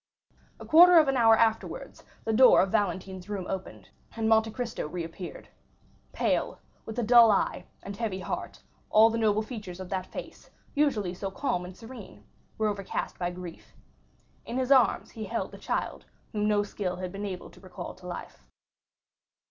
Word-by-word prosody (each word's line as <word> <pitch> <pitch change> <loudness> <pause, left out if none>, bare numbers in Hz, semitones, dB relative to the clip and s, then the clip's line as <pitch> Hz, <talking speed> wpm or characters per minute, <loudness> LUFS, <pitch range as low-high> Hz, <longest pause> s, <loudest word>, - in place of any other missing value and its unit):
A - - -9
quarter 350 +2 +8
of 310 -3 +6
an 270 - +1
hour 225 -2 +6
afterwards 225 -1 -1 0.2
the 225 - -1
door 255 +3 +7
of 190 - 0
Valentine's 190 -2 -2
room 200 -3 -3
opened, 190 -1 -6 0.3
and 225 -1 -1
Monte 220 0 +4
Cristo 235 -7 -4
reappeared. 170 +2 -7 0.6
Pale, - - 0 0.3
with 220 +1 -6
a 240 - 0
dull 235 0 +7
eye 205 - +1 0.2
and 200 +1 -6
heavy 210 -3 -3
heart, - - -5 0.3
all 220 +1 +6
the 230 - -1
noble 215 -1 +2
features 210 -6 -8
of 185 -1 -7
that 185 -1 -3
face, - - -9 0.2
usually 230 -11 +1
so 195 +2 -4
calm 190 -4 -2
and 180 +1 -10
serene, 220 - -11 0.3
were 220 - +1
overcast 200 -2 -4
by 175 -1 -1
grief. 175 -1 -10 0.7
In 240 - -5
his 260 +1 -1
arms 260 -4 +4
he 220 - -7
held 230 +4 -3
the - - -11
child, - - -3 0.3
whom 210 -2 0
no 205 -1 +3
skill 195 -3 -4
had 180 0 -5
been 200 +2 -6
able 185 -2 -7
to - - -17
recall 185 -2 -8
to 185 -1 -13
life. 175 - -8
210 Hz, 175 wpm, -28 LUFS, 185-230 Hz, 0.7 s, quarter